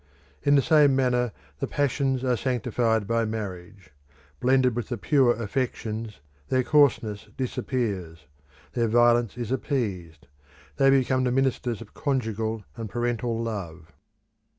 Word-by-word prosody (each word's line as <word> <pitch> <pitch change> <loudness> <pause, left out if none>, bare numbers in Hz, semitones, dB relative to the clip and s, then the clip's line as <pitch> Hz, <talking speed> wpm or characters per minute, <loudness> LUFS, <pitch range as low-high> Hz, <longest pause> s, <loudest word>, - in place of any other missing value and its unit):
In 145 - +4
the 140 - +4
same 145 -2 +5
manner 125 -2 +1 0.3
the - - -2
passions 135 -2 0
are 125 -1 +2
sanctified 115 -3 0
by 115 +2 +1
marriage. 95 -5 -6 0.5
Blended 130 - +3
with 120 -1 -3
the 120 - -2
pure 120 +6 +3
affections, 110 - -3 0.3
their 130 0 +2
coarseness 120 -8 +2
disappears: 100 - -3 0.5
their 120 -2 +1
violence 120 0 +3
is 120 -1 -4
appeased: 100 - -3 0.5
they 135 -1 +5
become 130 -1 +3
the 125 - +1
ministers 125 -3 0
of 110 - -12
conjugal 110 -6 -2
and 115 -3 -6
parental 120 0 -1
love. 90 -7 -6
120 Hz, 125 wpm, -26 LUFS, 110-130 Hz, 0.5 s, same